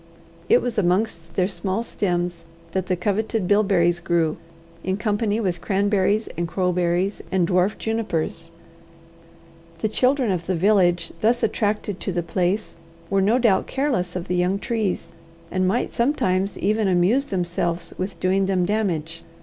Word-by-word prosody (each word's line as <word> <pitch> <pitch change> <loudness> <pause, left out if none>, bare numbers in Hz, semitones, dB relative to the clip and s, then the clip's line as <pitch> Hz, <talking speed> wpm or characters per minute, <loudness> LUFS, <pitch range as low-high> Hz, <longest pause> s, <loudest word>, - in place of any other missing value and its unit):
It - - +5
was 240 -3 -1
amongst 175 -3 0
their 185 -1 +2
small 195 +2 -2
stems 175 -5 -2 0.3
that 185 +1 -2
the 185 - +1
coveted 210 +2 -1
bilberries 190 -4 +3
grew, 170 -2 0 0.5
in 190 +1 -1
company 210 0 0
with 185 -5 -1
cranberries 205 +1 +1
and 170 0 -2
crowberries, 180 +2 0
and 185 -3 +2
dwarf 185 +3 +2
junipers. 170 -7 -2 1.3
The 190 - 0
children 255 0 +2
of 175 -2 -2
the 185 - +1
village 175 -2 +2
thus 235 +2 +2
attracted 210 -2 0
to - - -2
the 175 -1 -1
place 185 +4 -1 0.4
were 195 0 +3
no 215 +5 +3
doubt 225 -7 +3
careless 245 -11 -1
of 180 0 -4
the 180 - -1
young 180 +2 +1
trees, 205 -7 -2 0.4
and 185 0 +1
might 230 +6 0
sometimes 200 -7 0
even 210 +1 +1
amuse 190 +9 +3
themselves 175 -4 -2
with 185 -2 -4
doing 190 +2 +2
them 185 -2 +1
damage. 175 -6 -1
190 Hz, 150 wpm, -23 LUFS, 175-210 Hz, 1.3 s, It